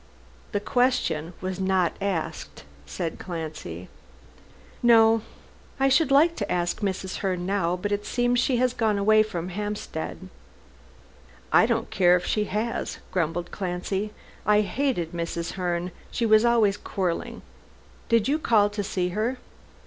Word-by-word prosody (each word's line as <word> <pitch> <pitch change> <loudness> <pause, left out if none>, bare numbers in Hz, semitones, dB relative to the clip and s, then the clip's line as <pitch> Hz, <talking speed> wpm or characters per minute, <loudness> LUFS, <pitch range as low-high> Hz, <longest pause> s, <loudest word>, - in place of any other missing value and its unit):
"The 205 - 0
question 205 - 0
was 185 0 -4
not 190 -2 +1
asked," 190 - -3 0.2
said 75 - -4
Clancy. 155 - -6 0.9
"No. 225 -1 +6 0.6
I 270 0 +4
should 275 +3 +3
like 310 +5 +5
to - - -3
ask 175 -1 0
Mrs. 190 -2 -3
Herne 185 -2 -2
now, 190 -3 0
but 205 +3 -4
it 205 0 -1
seems 245 +1 +1
she 250 0 +2
has 250 0 +2
gone 220 -4 +1
away 215 +2 +5
from 180 -5 -3
Hampstead." 195 -3 -5 1.3
"I - - +6
don't - - -1
care 180 -2 +5
if 180 - -1
she 210 -1 0
has," 215 +4 -2
grumbled 175 0 -1
Clancy, 190 +2 -3 0.3
"I 210 0 +4
hated 210 - -1
Mrs. 170 -1 -3
Herne. 180 -1 -2 0.2
She 235 - -1
was 215 +1 +5
always 220 -4 +3
quarrelling. 185 -5 -3 0.7
Did 230 -2 +3
you 295 +3 +1
call 210 -8 +3
to 205 0 -3
see 180 -2 -1
her?" 220 +7 -1
200 Hz, 140 wpm, -25 LUFS, 180-225 Hz, 1.3 s, No